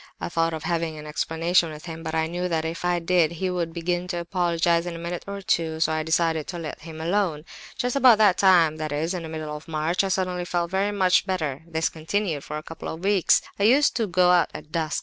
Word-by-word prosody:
I -, -, -4 dB
thought 165 Hz, -1 st, 0 dB
of 155 Hz, -, -7 dB
having 165 Hz, -1 st, -2 dB
an 150 Hz, -, -9 dB
explanation 165 Hz, +3 st, +1 dB
with 155 Hz, +2 st, -10 dB
him, 165 Hz, -1 st, -7 dB
but 160 Hz, -1 st, -4 dB
I 160 Hz, 0 st, +1 dB
knew 175 Hz, +2 st, -3 dB
that 160 Hz, -2 st, -1 dB
if 165 Hz, +2 st, -4 dB
I 175 Hz, 0 st, +1 dB
did, 170 Hz, -1 st, +2 dB
he 185 Hz, +2 st, -2 dB
would 170 Hz, -2 st, -2 dB
begin 175 Hz, +1 st, -2 dB
to 175 Hz, -, -3 dB
apologize 170 Hz, -1 st, +1 dB
in 170 Hz, -, -4 dB
a -, -, -6 dB
minute 170 Hz, +1 st, -5 dB
or 200 Hz, 0 st, -6 dB
two, 160 Hz, -3 st, 0 dB
so 160 Hz, 0 st, +2 dB
I 155 Hz, 0 st, 0 dB
decided 160 Hz, -1 st, 0 dB
to 175 Hz, -, -5 dB
let 160 Hz, -3 st, -6 dB
him 160 Hz, 0 st, -9 dB
alone. 165 Hz, -2 st, -1 dB, 0.3 s
"Just 245 Hz, +1 st, -1 dB
about 255 Hz, -5 st, +6 dB
that 205 Hz, -4 st, +4 dB
time, 170 Hz, -5 st, +5 dB
that 155 Hz, -1 st, -4 dB
is, 155 Hz, +3 st, -1 dB
the 180 Hz, -2 st, -3 dB
middle 155 Hz, -1 st, -5 dB
of 150 Hz, +2 st, -10 dB
March, 160 Hz, +4 st, 0 dB
I -, -, 0 dB
suddenly 185 Hz, -1 st, -1 dB
felt 175 Hz, -1 st, -2 dB
very 195 Hz, +2 st, +1 dB
much 190 Hz, -1 st, +2 dB
better; 155 Hz, -7 st, -2 dB
this 160 Hz, -1 st, 0 dB
continued 160 Hz, -1 st, -2 dB
for 150 Hz, -, -5 dB
a 155 Hz, -, -7 dB
couple 165 Hz, -, -8 dB
of 160 Hz, +3 st, -7 dB
weeks. 195 Hz, -2 st, +3 dB, 0.2 s
I -, -, +1 dB
used 275 Hz, +6 st, +4 dB
to 225 Hz, -3 st, 0 dB
go 180 Hz, 0 st, +3 dB
out 175 Hz, -3 st, +4 dB
at 155 Hz, -, -9 dB
dusk. 160 Hz, -2 st, -1 dB
170 Hz, 250 wpm, -24 LUFS, 160-180 Hz, 0.3 s, about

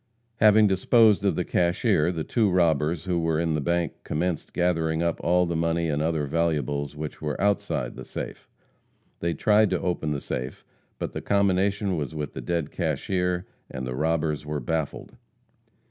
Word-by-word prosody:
Having 110 Hz, -1 st, +6 dB
disposed 105 Hz, +2 st, +4 dB
of 100 Hz, -, +2 dB
the 90 Hz, -, -1 dB
cashier, 85 Hz, -1 st, +2 dB
the 80 Hz, -3 st, -3 dB
two 110 Hz, +2 st, +1 dB
robbers 85 Hz, -3 st, +2 dB
who 90 Hz, -2 st, 0 dB
were 80 Hz, -1 st, 0 dB
in 85 Hz, -1 st, 0 dB
the 75 Hz, -, 0 dB
bank 85 Hz, +2 st, 0 dB
commenced 85 Hz, +1 st, -2 dB
gathering 80 Hz, -2 st, 0 dB
up 85 Hz, -1 st, -1 dB
all 90 Hz, +1 st, +3 dB
the 85 Hz, -1 st, -2 dB
money 85 Hz, 0 st, 0 dB
and 75 Hz, 0 st, 0 dB
other 80 Hz, -2 st, 0 dB
valuables 70 Hz, -2 st, -1 dB
which 75 Hz, 0 st, -6 dB
were 75 Hz, -1 st, -3 dB
outside 100 Hz, +1 st, 0 dB
the -, -, -8 dB
safe. -, -, -7 dB, 0.7 s
They 85 Hz, 0 st, -1 dB
tried 105 Hz, 0 st, +4 dB
to 90 Hz, -2 st, 0 dB
open 90 Hz, -4 st, -2 dB
the 75 Hz, -1 st, -1 dB
safe, 65 Hz, -1 st, -5 dB, 0.3 s
but -, -, -4 dB
the -, -, -4 dB
combination 100 Hz, -1 st, +1 dB
was 75 Hz, +1 st, -4 dB
with 75 Hz, -2 st, -4 dB
the -, -, -6 dB
dead 85 Hz, -4 st, -2 dB
cashier, 90 Hz, +3 st, -1 dB, 0.2 s
and 65 Hz, 0 st, -5 dB
the 65 Hz, -, -4 dB
robbers 75 Hz, +1 st, 0 dB
were 75 Hz, 0 st, -3 dB
baffled. 80 Hz, +3 st, -3 dB
85 Hz, 175 wpm, -26 LUFS, 75-90 Hz, 0.7 s, Having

